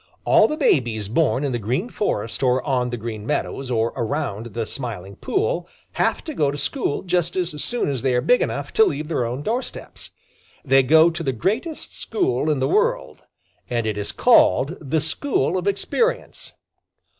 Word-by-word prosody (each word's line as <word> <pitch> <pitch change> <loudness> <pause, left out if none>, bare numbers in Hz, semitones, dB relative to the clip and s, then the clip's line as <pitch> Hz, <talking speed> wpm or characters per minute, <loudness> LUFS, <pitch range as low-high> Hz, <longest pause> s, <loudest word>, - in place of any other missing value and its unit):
All - - +6
the 305 - -3
babies 115 - +1
born 135 +3 +1
in 140 - -1
the 120 - -1
Green 125 - -1
Forest 115 - -2
or 130 -1 +2
on 125 -4 0
the 120 - -4
Green 110 -2 -6
Meadows 135 0 -2
or 115 -1 0
around 110 -2 -3
the 115 -1 -1
Smiling 105 -7 -6
Pool 445 +6 -1 0.2
have - - 0
to 315 - -6
go 150 - +1
to 145 - -4
school 145 - -2
just 175 -2 0
as 175 -5 -2
soon 245 0 0
as 135 -4 -2
they 130 -2 +1
are 125 - +2
big 245 - +3
enough - - -3
to 445 - +6
leave 155 - -2
their 125 -7 0
own 125 +5 -4
doorsteps. 240 - -5 0.6
They 135 0 +5
go 160 +5 +5
to 170 +1 -5
the 135 -5 -1
greatest 225 - -3
school 375 - -1
in 150 -3 +1
the 130 - +1
world, 475 +3 0 0.4
and 120 -2 -1
it 110 -2 -1
is 105 0 -3
called 135 - +4
the 155 +1 0
School 160 - 0
of 185 +1 -2
Experience. 330 - -1
140 Hz, 185 wpm, -22 LUFS, 120-185 Hz, 0.6 s, All